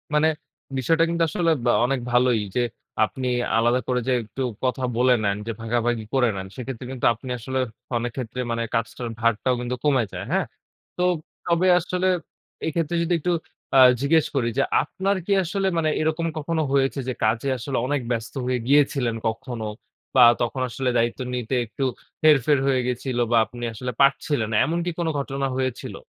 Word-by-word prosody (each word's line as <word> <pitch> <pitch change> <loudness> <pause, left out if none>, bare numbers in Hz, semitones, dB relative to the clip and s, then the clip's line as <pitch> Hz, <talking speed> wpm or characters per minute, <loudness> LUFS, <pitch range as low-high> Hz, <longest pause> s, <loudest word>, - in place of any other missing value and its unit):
মানে, 150 +1 +4 0.5
বিষয়টা 160 +6 +3
কিন্তু 170 0 +1
আসলে 165 +1 +1
ব্যা 120 - +4
অনেক 135 +1 0
ভালোই 125 -2 +3
যে, 125 - +3 0.4
আপনি 130 +3 -5 0.3
আলাদা 120 +2 +3
করে 125 -1 +1
যে 130 - +3
একটু 110 +5 -7 0.2
কথা 130 0 0
বলে 125 +1 +5
নেন, 100 0 +1
যে - - -1
ভাগাভাগি 115 0 0
করে 130 -3 +3
নেন 95 0 -5
সেক্ষেত্রে 130 -1 -6
কিন্তু 130 -2 -3
আপনি 115 +3 -10
আসলে 130 +3 -3 0.4
অনেক 120 0 -2
ক্ষেত্রে 125 -1 -5
মানে 115 0 -1
কাজটার 115 +1 -2
ভারটাও 115 +2 +2
কিন্তু 125 +1 -2
কমে 135 -5 +3
যায়, - - -5
হ্যাঁ? - - +2 0.5
তো 180 - +1 0.4
তবে 170 +2 +2
আসলে 180 +2 -1 0.6
এক্ষেত্রে 165 +1 -1
যদি 170 +1 0
একটু 180 +4 0 0.5
আ - - +8 0.2
জিজ্ঞেস 160 +3 +3
করি 120 -3 +1
যে, 135 - +4 0.2
আপনার 190 +6 -1
কি 205 - -3
আসলে 195 +3 -1
মানে 155 -1 +2
এরকম 160 +2 0
কখনো 160 +1 -1
হয়েছে? 135 0 +2
যে 130 - -1
কাজে 115 +5 +1
আসলে 130 +2 -3
অনেক 145 0 0
ব্যস্ত 115 -1 -3
হয়ে 125 0 0
গিয়েছিলেন 135 -4 +3
কখনো, 115 0 -4 0.5
বা 130 - +8 0.2
তখন 120 +2 -1
আসলে 130 +2 -1
দায়িত্ব 115 0 0 0.2
নিতে 125 +1 -2
একটু 115 +5 -5 0.4
হেরফের 145 -2 +5
হয়ে 130 -2 +3
গেছিল, 125 0 -2
বা 120 - +5
আপনি 120 +3 -10
আসলে 125 +4 -4
পারছিলেন 140 -3 +2
না। - - 0
এমন 165 +4 -1
কি 175 - -1
কোন 170 - 0
ঘটনা 135 0 -2
হয়েছিল? 130 -2 -3
130 Hz, 175 wpm, -24 LUFS, 120-150 Hz, 0.6 s, আ